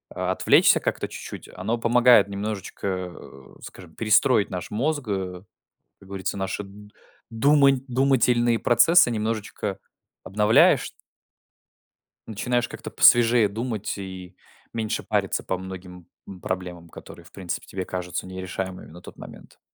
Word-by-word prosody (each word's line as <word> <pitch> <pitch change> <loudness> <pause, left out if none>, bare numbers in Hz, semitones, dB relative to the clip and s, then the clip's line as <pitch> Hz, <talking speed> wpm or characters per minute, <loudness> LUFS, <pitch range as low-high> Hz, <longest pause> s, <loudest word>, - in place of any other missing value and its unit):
а, - - -1
отвлечься - - +4
как-то - - -3
чуть-чуть, - - -9
оно 110 +6 -2
помогает 120 -2 +5
немножечко, 100 0 -5 0.3
э, 65 -1 -14
скажем, 90 -3 -12
перестроить 110 0 +3
наш 90 -2 -6
мозг. 145 +5 -1
Как 95 -2 -6 0.4
говорится, 95 0 -4
наши 95 +1 -3
д 105 +1 -14 0.4
думань 140 +2 +4
думательные 125 -3 +2
процессы 165 +5 +5
немножечко 110 -3 -3 0.4
обновляешь 105 +3 +3 1.4
начинаешь 120 +3 -1
как-то - - -9
посвежее 120 -2 +5
думать 110 0 -4
и 95 -1 -9 0.4
меньше 110 -2 -3
париться - - -1
по 95 - -2
многим 90 -1 -10 0.2
м 95 -2 -11
проблемам, 90 -2 -5
которые, - - -13
в - - -17
принципе, 90 -3 -6
тебе 95 -1 -5
кажутся 90 0 -5
нерешаемыми 95 0 -6
на 85 +2 -13
тот - - -13
момент. - - -13
105 Hz, 125 wpm, -24 LUFS, 95-120 Hz, 1.4 s, помогает